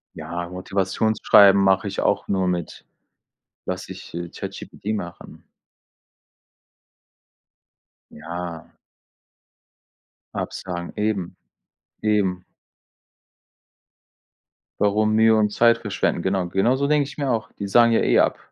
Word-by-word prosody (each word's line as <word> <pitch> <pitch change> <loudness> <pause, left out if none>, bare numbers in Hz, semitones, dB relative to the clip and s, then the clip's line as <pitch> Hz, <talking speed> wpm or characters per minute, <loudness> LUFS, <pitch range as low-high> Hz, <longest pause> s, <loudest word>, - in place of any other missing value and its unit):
Ja, 85 0 -5
Motivationsschreiben 100 +2 +3
mache 95 +1 +3
ich 100 - -4
auch - - 0
nur 95 -2 0
mit 90 -2 -4 0.8
lasse - - -5
ich, - - -11
äh, 85 0 -5
ChatGPT 105 +5 -6
machen. 85 -4 -8 2.7
Ja. 85 +1 -7 1.7
Absagen, 85 -2 -5
eben. 105 -4 -2 0.7
Eben. 100 -4 0 2.4
Warum 105 +1 +2
Mühe 110 0 +5
und 105 -1 +2
Zeit 115 +2 +4
verschwenden? 105 -5 -1
Genau, 95 0 -1
genau 95 +8 +2
so 140 +1 0
denke 145 -1 +2
ich - - -12
mir 140 -3 -1
auch. 115 -2 -2
Die 100 - -6
sagen 115 +4 +5
ja - - +3
eh - - +3
ab, - - +2
100 Hz, 105 wpm, -22 LUFS, 90-110 Hz, 2.7 s, Mühe